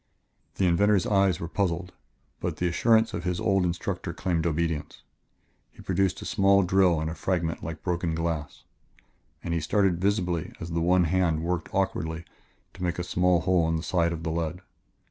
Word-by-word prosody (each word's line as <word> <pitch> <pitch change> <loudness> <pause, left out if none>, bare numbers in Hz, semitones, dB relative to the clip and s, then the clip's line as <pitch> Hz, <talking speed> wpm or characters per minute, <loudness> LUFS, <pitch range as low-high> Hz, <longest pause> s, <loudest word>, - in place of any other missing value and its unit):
The 95 - +1
inventor's 95 +2 +3
eyes 95 -4 +2
were 85 - -4
puzzled, 90 -1 -2 0.5
but - - -3
the 90 - 0
assurance 110 +6 +3
of 85 - -4
his 90 -1 -1
old 95 -3 +2
instructor 90 0 -3
claimed 85 -3 0
obedience. 80 -1 -2 0.7
He - - -15
produced 95 0 0
a - - -8
small 100 0 +3
drill 90 -2 +3
and 80 - -2
a 80 - -3
fragment 85 -2 -2
like 80 0 -6
broken 85 -2 -1
glass. 80 -3 -3 0.8
And 85 - -2
he 85 - +1
started 90 +1 +1
visibly 90 -5 0
as 80 +1 -6
the 85 0 -1
one 90 +2 +4
hand 85 -2 +1
worked 85 -1 -2
awkwardly 85 -4 -2 0.5
to - - -13
make 90 -1 -1
a 90 - -2
small 90 0 +2
hole 90 -2 +2
in 80 - +1
the 80 - -3
side 85 -2 +1
of 80 -1 -5
the 80 - -2
lead. 85 +2 -3
85 Hz, 185 wpm, -27 LUFS, 85-95 Hz, 0.8 s, one